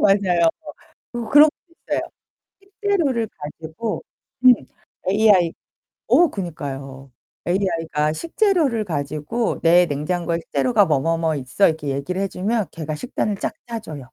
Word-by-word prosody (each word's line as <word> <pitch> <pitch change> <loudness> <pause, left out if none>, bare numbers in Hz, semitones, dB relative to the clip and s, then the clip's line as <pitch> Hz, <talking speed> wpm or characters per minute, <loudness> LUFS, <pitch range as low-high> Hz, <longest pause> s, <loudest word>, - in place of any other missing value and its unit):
맞아요. 185 -4 +4 0.6
그 235 -2 -4
그런 295 +4 +8 0.2
것도 335 - -28
있어요. - - +1 0.6
식재료를 390 - -1
가지고 160 +8 -5 0.4
음 250 - +10 0.6
AI 200 -5 +4 0.5
어 350 -2 +5
그니까요. 140 -7 -6 0.4
AI가 165 -5 0
식재료를 325 - +1
가지고 155 +7 -2
"내 175 +1 +5
냉장고에 165 +3 -2
식재료가 220 +3 +2
뭐 145 -4 +2
뭐 165 +3 +1
뭐 160 -1 0
있어." 135 +9 +2
이렇게 155 -3 -3
얘기를 140 +8 -2
해 195 - 0
주면 205 +2 -1
걔가 155 -2 -5
식단을 210 - -2
쫙 - - -3
짜줘요. 225 -11 -6
180 Hz, 290 characters per minute, -21 LUFS, 155-230 Hz, 0.6 s, 음